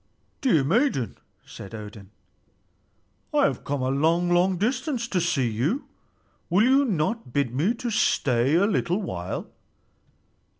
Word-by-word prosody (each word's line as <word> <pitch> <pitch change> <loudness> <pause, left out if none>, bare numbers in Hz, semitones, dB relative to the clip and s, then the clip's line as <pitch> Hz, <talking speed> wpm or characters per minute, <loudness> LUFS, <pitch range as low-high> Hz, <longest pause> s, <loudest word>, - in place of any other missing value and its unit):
"Dear 170 - +3
maiden," 145 - 0 0.3
said 100 +3 -10
Odin, 105 -2 -10 1.3
"I - - +4
have - - 0
come 140 -2 -2
a 130 - 0
long, 165 +6 +1
long 180 +1 +3
distance 250 - -1
to 185 -5 0
see 140 -7 +1
you. 130 - -1 0.6
Will 185 +5 +4
you 270 +3 +4
not 195 - -1
bid 140 -4 0
me 170 - +1 0.2
stay 135 - +2
a 185 +4 +4
little 195 -2 0
while?" 90 - -4
170 Hz, 130 wpm, -25 LUFS, 130-215 Hz, 1.3 s, I